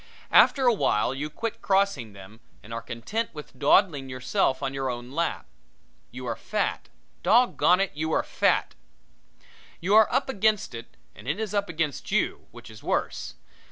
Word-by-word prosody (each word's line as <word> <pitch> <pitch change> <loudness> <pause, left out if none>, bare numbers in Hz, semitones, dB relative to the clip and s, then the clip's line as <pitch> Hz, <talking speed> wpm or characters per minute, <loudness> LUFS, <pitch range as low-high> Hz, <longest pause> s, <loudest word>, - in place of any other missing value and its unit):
After 270 -2 +6
a 240 - +6
while 125 - +1
you 145 +3 -4
quit 225 +8 -5
crossing 190 - +1
them 100 +3 -13 0.2
and 115 - -9
are 115 - -4
content 125 - -4
with 150 - -10
dawdling 145 -8 +3
yourself 130 +1 0
on 135 0 -2
your 135 -1 -2
own 120 0 -6
lap. 165 +4 -2 0.6
You - - -8
are - - -2
fat! - - -3 0.3
Dog 245 +2 +4
gone 180 +1 +4
it 195 -1 0
you 160 +2 -3
are - - +2
fat! - - +1 1.1
You 190 +4 0
are 220 0 +6
up - - +1
against 215 - +1
it 115 0 -10 0.2
and 105 - -14
it 150 +9 -1
is 215 -2 -3
up 200 -2 0
against 155 -4 -3
you, - - 0
which - - -13
is - - -13
worse. - - -2
150 Hz, 175 wpm, -26 LUFS, 125-200 Hz, 1.1 s, After